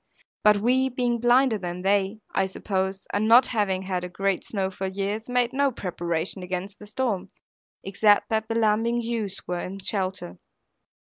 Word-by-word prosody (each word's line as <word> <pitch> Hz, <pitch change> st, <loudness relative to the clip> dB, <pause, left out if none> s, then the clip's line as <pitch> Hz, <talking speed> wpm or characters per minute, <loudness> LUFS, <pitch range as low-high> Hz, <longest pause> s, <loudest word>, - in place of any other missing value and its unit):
But 210 Hz, -1 st, +6 dB
we, 255 Hz, +5 st, +2 dB
being 245 Hz, -2 st, 0 dB
blinder 240 Hz, -1 st, +4 dB
than 180 Hz, 0 st, -5 dB
they, 200 Hz, +2 st, +1 dB
I 190 Hz, -, +1 dB
suppose, 190 Hz, 0 st, -3 dB
and 210 Hz, +2 st, +1 dB
not 240 Hz, +3 st, +7 dB
having 195 Hz, -5 st, 0 dB
had 185 Hz, -2 st, -2 dB
a 180 Hz, -, -5 dB
great 195 Hz, +1 st, -1 dB
snow 190 Hz, -3 st, -2 dB
for 190 Hz, 0 st, -4 dB
years, 200 Hz, +4 st, -3 dB
made 245 Hz, 0 st, +1 dB
no 280 Hz, 0 st, +2 dB
preparation 175 Hz, -3 st, -3 dB
against 185 Hz, +2 st, -5 dB
the 210 Hz, -, -11 dB
storm, 210 Hz, -4 st, -2 dB, 0.5 s
except 205 Hz, +2 st, +3 dB
that 220 Hz, 0 st, 0 dB
the 225 Hz, -, -2 dB
lambing 230 Hz, +1 st, +2 dB
ewes 225 Hz, -4 st, -3 dB
were 180 Hz, -1 st, -3 dB
in 185 Hz, +2 st, -5 dB
shelter. 185 Hz, -, -4 dB
205 Hz, 165 wpm, -25 LUFS, 190-230 Hz, 0.5 s, not